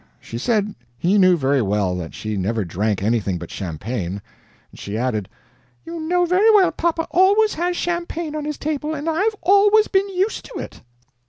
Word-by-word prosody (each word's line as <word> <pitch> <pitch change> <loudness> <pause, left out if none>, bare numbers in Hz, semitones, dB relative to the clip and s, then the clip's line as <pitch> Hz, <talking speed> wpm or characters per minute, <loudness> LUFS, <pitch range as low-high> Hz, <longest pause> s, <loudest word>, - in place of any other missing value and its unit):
She 115 - -7
said 210 - 0 0.2
he 190 +9 +2
knew 185 -2 +5
very 135 -2 +1
well 100 -3 0
that 85 -2 -7
she 110 -1 -4
never 100 +2 -1
drank 100 +3 -1
anything 105 -4 0
but 85 0 -9
champagne. 95 +2 -4 0.5
She 100 +2 -6
added: 110 -5 -2 0.6
"You 335 0 -6
know 355 +3 +1
very 370 +5 +4
well 385 -3 +5
papa 330 -1 -1
always 400 +5 +4
has 350 +2 -1
champagne 340 -2 -3
on 300 -1 -4
his 300 -1 -4
table, 305 +1 -3
and 295 +2 -5
I've 390 +7 +1
always 410 +4 +5
been 390 0 +1
used 390 +3 -1
to - - -12
it." - - -8
290 Hz, 175 wpm, -21 LUFS, -, 0.6 s, knew